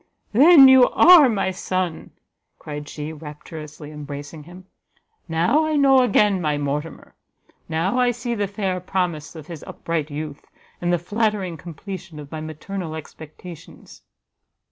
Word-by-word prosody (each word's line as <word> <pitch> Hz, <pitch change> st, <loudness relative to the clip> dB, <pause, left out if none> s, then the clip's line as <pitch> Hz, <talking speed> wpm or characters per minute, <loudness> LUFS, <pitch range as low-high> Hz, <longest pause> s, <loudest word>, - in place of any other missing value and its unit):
"Then 280 Hz, +4 st, +8 dB
you 260 Hz, -1 st, +7 dB
are 330 Hz, -5 st, +7 dB
my 195 Hz, -4 st, 0 dB
son!" 185 Hz, -2 st, -3 dB, 0.5 s
cried 150 Hz, -1 st, -8 dB
she, 150 Hz, +1 st, -6 dB
rapturously 150 Hz, 0 st, -10 dB
embracing 145 Hz, +1 st, -8 dB
him; 180 Hz, +2 st, -13 dB, 0.6 s
"now 175 Hz, -, +2 dB
I 310 Hz, 0 st, -1 dB
know 275 Hz, -2 st, +5 dB
again 205 Hz, -5 st, +2 dB
my 150 Hz, -3 st, 0 dB
Mortimer! 145 Hz, +2 st, -5 dB, 0.6 s
now 170 Hz, +9 st, 0 dB
I 250 Hz, -1 st, +3 dB
see 240 Hz, 0 st, -3 dB
the 205 Hz, -3 st, -1 dB
fair 195 Hz, -2 st, -3 dB
promise 175 Hz, -4 st, -3 dB
of 155 Hz, -2 st, -9 dB
his 165 Hz, -2 st, -9 dB
upright 165 Hz, -3 st, -4 dB
youth, 145 Hz, 0 st, -6 dB, 0.4 s
and 175 Hz, 0 st, 0 dB
the 175 Hz, -, +3 dB
flattering 205 Hz, -1 st, -2 dB
completion 170 Hz, 0 st, -9 dB
of 145 Hz, -1 st, -10 dB
my 155 Hz, -, -5 dB
maternal 160 Hz, +2 st, -6 dB
expectations!" 160 Hz, +2 st, -12 dB
175 Hz, 140 wpm, -22 LUFS, 155-205 Hz, 0.6 s, Then